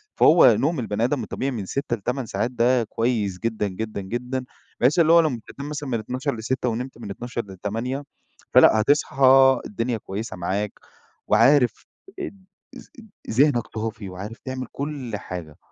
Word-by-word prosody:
فهو 155 -8 +7
نوم 155 0 0
البني 110 -1 -2
آدم 125 -1 0
الطبيعي 135 +5 -3
من 105 -6 -4
6 135 +3 -3
ل8 125 +4 -2
ساعات 110 +3 -2
ده 120 0 +2
كويس 110 -4 -1
جدًا، 110 -3 -1
جدًا، 105 +1 -5
جدًا 125 +6 -3 0.4
بحيث 135 +8 +3
اللي 165 -1 +5
هو 170 - +8
لمّا 150 -8 +1 0.2
تنام 140 +1 -5
مثلًا 145 -2 -5
من 115 - 0
00:00 130 +5 -3
ل06:00 125 +3 -2
ونمت 125 +3 -4
من 110 -4 -7
00:00 120 +3 -4
ل08:00 115 +9 -4 0.5
فلأ، 110 - +7
هتصحى 135 0 +5
الدنيا 115 +3 -2
كويسة 105 -1 -6
معاك، 100 +4 -2 0.6
وعارف 120 +2 +4 0.3
اد 200 - -7 0.3
اذ - - -11 0.5
ذِهنك 130 -1 +3
صافي 110 -2 -4
وعارف 100 +6 -7
تعمل 130 -1 -4
كل 140 -7 -4
حاجة. 85 -6 -8
120 Hz, 155 wpm, -23 LUFS, 105-135 Hz, 0.6 s, هو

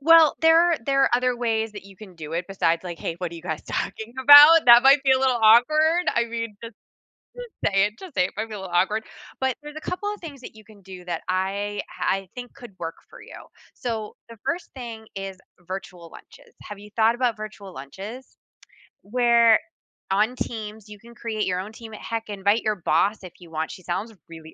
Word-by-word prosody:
Well, 320 0 +6
there 325 0 +6
are - - +1
there 275 +1 +2
are - - +3
other 250 0 +1
ways 225 -2 -1
that 205 -2 -10
you 195 -1 -15
can 190 -3 -13
do 155 -1 -9
it 170 +2 -2
besides 170 -3 0
like, 175 -2 -6
"Hey, 165 - -4
what 175 -2 -4
are - - -8
you 165 - -10
guys 160 -3 -4
talking 220 +1 -5
about?" 295 +3 +9
That 240 0 +9
might 275 +1 +6
be 270 -1 +4
a 260 - +3
little 260 -2 +2
awkward. 310 +10 +5
I 235 - +2
mean, 230 -2 -5
just 230 -1 -9 0.6
just - - -9 0.2
say 195 +1 +4
it. 210 - -4
Just 370 -6 -11
say 180 - +3
it, - - -5
might 220 +1 -2
be 220 - -10
a - - -7
little 190 -2 -8
awkward. 200 +5 +1 0.4
But 265 -2 0
there's 295 0 -10
a 310 - -7
couple 410 +5 -4
of 415 - -11
things 295 -5 -9
that 245 - -11
you 215 - -15
can 210 -2 -18
do 185 -1 -11
that 170 -2 -4
I 195 +2 -2
ah, - - -6
I 195 0 -1
think 245 -1 -9
could 240 -3 -12
work 165 - -5
for - - -14
you. - - -12 0.4
So, 220 -3 -5
the 230 - -12
1st 340 +1 -3
thing 230 -4 -8
is 195 -1 -6 0.3
virtual 180 -2 -8
lunches. - - -16
Have 210 -1 -9
you 205 +1 -13
thought 225 +1 +3
about 245 -2 0
virtual 210 -2 -9
lunches? 195 - -10 0.6
Where 235 0 +4 0.5
on 215 +6 +1
Teams, 215 -2 -6
you 210 0 -11
can 235 +3 -16
create 220 -3 -3
your 180 -1 -1
own 200 +4 -7
team 225 -1 -11
at 215 - -9
heck, 225 -1 -5
invite 205 +2 +1
your 215 -1 -1
boss 185 +5 +1
if 180 - -10
you 175 -2 -15
want. 160 0 -3
She 185 - -11
sounds 200 +7 -4 0.2
really 160 -1 -12
220 Hz, 225 wpm, -24 LUFS, 190-245 Hz, 0.6 s, about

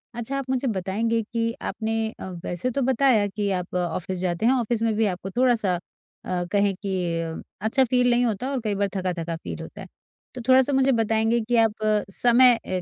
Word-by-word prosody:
अच्छा 240 +4 -3
आप 270 -1 -5
मुझे 260 0 0
बताएँगे 220 +3 0
कि 230 0 0
आपने 225 0 -2
अ, 190 - -6 0.2
वैसे 180 +9 -2
तो 275 - -1
बताया 255 -4 +3
कि 200 0 -2
आप 180 0 -8
ऑफिस 180 +1 -2
जाते 180 +3 -1
हैं, 255 - +5
ऑफिस 235 -2 0
में 225 -1 +1
भी 220 0 +2
आपको 190 0 -3
थोड़ा-सा 230 -5 +2
अ, 180 +1 -7
कहें 200 -1 +2
कि 170 -4 -2 0.2
अच्छा 245 +5 +2
फ़ील 250 0 +2
नहीं 245 +1 +3
होता 235 +4 -2
और 270 - -1
कई 210 -2 -1
बार 200 0 +1
थका-थका 175 -3 -2
फ़ील 165 - -7
होता - - -9
है। - - -9 0.5
तो 250 - -5
थोड़ा-सा 260 +2 +5
मुझे 270 0 +3
बताएँगे 225 0 +2
कि 240 - +2
आप 225 -2 +4 0.4
समय 240 +2 +5
ए 185 -1 -2
225 Hz, 195 wpm, -24 LUFS, 190-245 Hz, 0.5 s, हैं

